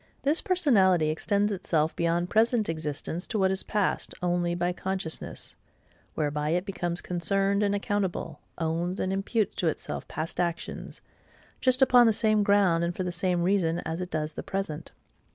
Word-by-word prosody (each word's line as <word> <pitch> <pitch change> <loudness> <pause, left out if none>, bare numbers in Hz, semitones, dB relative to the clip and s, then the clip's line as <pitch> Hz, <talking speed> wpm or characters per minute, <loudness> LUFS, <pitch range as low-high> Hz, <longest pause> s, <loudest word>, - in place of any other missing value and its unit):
This 295 +4 +2
personality 205 - +3
extends 200 +6 +1
itself 165 -5 0
beyond 170 +1 0
present 225 0 +3
existence 155 +2 -4
to 220 - -2
what 190 -2 +3
is 190 - -1
past, 210 -3 -1
only 175 -1 +1
by 175 +1 0
consciousness,—whereby 160 -4 -5
it 175 +3 0
becomes 175 -3 -2
concerned 195 +3 +1
and 205 -1 +2
accountable; 200 -2 -2 0.2
owns 170 +3 -2
and 190 - -1
imputes 200 +2 0
to 175 - 0
itself 155 - -3
past 155 +2 -4
actions, 170 -1 -3 0.6
just 255 +1 +4
upon 245 -2 +6
the 225 - +4
same 215 -1 +3
ground 200 -5 +3
and 170 0 -1
for 185 - -2
the 180 - -2
same 175 0 0
reason 175 -3 +2
as 165 +2 -3
it 180 - -4
does 155 -2 -3
the - - -5
present. 170 -5 -4
180 Hz, 160 wpm, -27 LUFS, 170-205 Hz, 0.6 s, upon